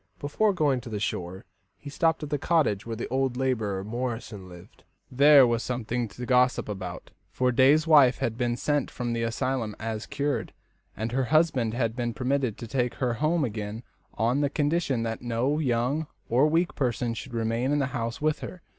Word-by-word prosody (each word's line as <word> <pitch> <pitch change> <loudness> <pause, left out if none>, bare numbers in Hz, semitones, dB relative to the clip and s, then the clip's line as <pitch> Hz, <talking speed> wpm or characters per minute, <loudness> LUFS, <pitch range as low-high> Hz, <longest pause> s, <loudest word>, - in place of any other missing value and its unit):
Before 205 +9 +1
going 145 -8 +1
to 120 - -9
the 105 -2 -3
shore, 95 -2 -4 0.3
he 145 - -10
stopped 160 +2 +1
at 150 - -6
the 145 - 0
cottage 135 - +1
where 115 - -3
the 115 - -4
old 130 -1 0
labourer, 110 -7 -1
Morrison, 115 -3 -5
lived. 90 +5 -15 0.3
There 140 +1 +7
was 120 -1 0
something 120 -1 -2
to 125 +4 -8
gossip 125 0 +2
about, 95 -4 -6 0.2
for 125 0 +1
Day's 140 +6 +4
wife 145 -6 +6
had 110 - -2
been 120 0 -1
sent 145 0 0
from 120 -1 -3
the 115 - -2
asylum 115 -1 -2
as 110 -1 -4
cured, 145 0 -2 0.4
and 110 +2 -3
her 130 +1 0
husband 135 -7 +2
had 115 -3 -1
been 120 -2 -2
permitted 130 -3 -1
to 115 - -7
take 125 0 -1
her 125 -3 -1
home 155 +5 +1
again 110 0 -5 0.3
on 120 +6 +1
condition 145 -4 0
that 115 -1 -3
no 125 +5 0
young 130 +3 0 0.2
or 130 +6 +3
weak 165 +3 +1
person 120 -3 -1
should 120 +1 -7
remain 115 +3 0
in 145 - +2
the 140 - +1
house 115 -2 -3
with 155 0 0
her. 180 - -8
125 Hz, 190 wpm, -27 LUFS, 115-140 Hz, 0.4 s, There